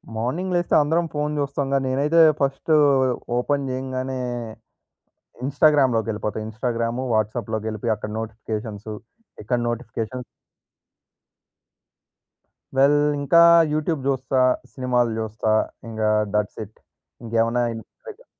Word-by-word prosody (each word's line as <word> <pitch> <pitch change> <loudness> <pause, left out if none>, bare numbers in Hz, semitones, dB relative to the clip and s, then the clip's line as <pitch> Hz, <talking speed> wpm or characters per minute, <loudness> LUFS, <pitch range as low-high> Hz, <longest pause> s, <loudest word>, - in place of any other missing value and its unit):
Morning 155 +12 -2
లేస్తే 175 0 +1
అందరం 165 +3 +1
phone 150 0 -1
చూస్తాంగా, 140 -1 -1
నేనైతే 145 +6 +3 0.2
ఫస్ట్, 140 +3 -1 0.7
ఓపెన్ 140 +2 0
జేయంగానే, 130 0 -3 1.3
ఇన్‌స్టాగ్రామ్‌లోకెళ్ళిపోతా. 125 -8 +2
ఇన్‌స్టాగ్రాము, 115 +2 -2
వాట్సాప్‌లోకెళ్లిపోయి. 110 0 -1
అక్కడ 105 0 -7
నోటిఫికేషన్స్ 110 -1 -6 0.6
ఇక్కడ 120 +3 0
నోటిఫికేషన్స్ 120 +1 -4 2.5
వెల్ 140 +2 +5 0.2
ఇంకా 170 +4 +5 0.3
యూట్యూబ్ 155 -2 -1
జూస్తా. 130 -1 0 0.3
సినిమాలు 125 -2 0
జూస్తా. 110 0 -1 0.4
ఇంగా 110 -1 0 0.2
థట్స్ 105 +1 -1
ఇట్. 105 - -22 0.5
ఇంకేమున్నాయ 115 +1 0
ఇంటి 115 - -10 0.2
దగ్గర 455 +2 -11
125 Hz, 90 wpm, -23 LUFS, 110-140 Hz, 2.5 s, వెల్